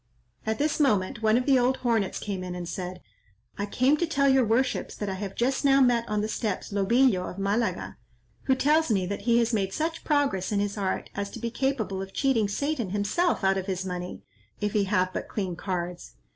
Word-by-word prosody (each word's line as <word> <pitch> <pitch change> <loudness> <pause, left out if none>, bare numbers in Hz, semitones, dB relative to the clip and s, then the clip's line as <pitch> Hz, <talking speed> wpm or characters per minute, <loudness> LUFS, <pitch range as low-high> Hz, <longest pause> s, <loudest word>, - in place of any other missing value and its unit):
At 220 0 0
this 300 +2 0
moment 215 -8 +2
one 220 +1 +4
of 250 - 0
the 270 -2 +5
old 250 +2 +2
hornets 225 -6 0
came 195 -3 -4
in 180 -1 -5
and 175 -1 -5
said, 180 0 -5 0.6
"I 205 - -1
come 255 +8 +3
to 345 - 0
tell 280 -3 +2
your 265 -1 +5
worships 235 +4 0
that 205 - -4
I - - -2
have 195 0 -5
just 260 +4 0
now 275 -1 +5
met 240 -3 +3
on 210 0 0
the 215 - -1
steps, 215 -3 -3
Lobillo 200 0 +3
of - - -9
Malaga, 205 +4 -1 0.5
who 265 - +3
tells 300 +4 +3
me 195 -4 +2
that 200 +2 -4
he 235 - +5
has 235 0 +2
made 195 -3 0
such 325 +1 -2
progress 280 - +1
in 205 - +1
his 205 0 -1
art 195 -3 -2
as 200 0 -3
to - - -8
be 235 -1 -3
capable 235 -7 -1
of 195 0 -7
cheating 250 -6 +2
Satan 260 0 -2
himself 205 - 0
out 195 0 +3
of 190 - -6
his 190 -1 -2
money, 180 -1 -5 0.4
if 210 -1 -1
he 205 -2 +2
have 185 -2 +1
but - - -4
clean 190 -4 -3
cards. 180 -1 -4
210 Hz, 220 wpm, -27 LUFS, 190-260 Hz, 0.6 s, the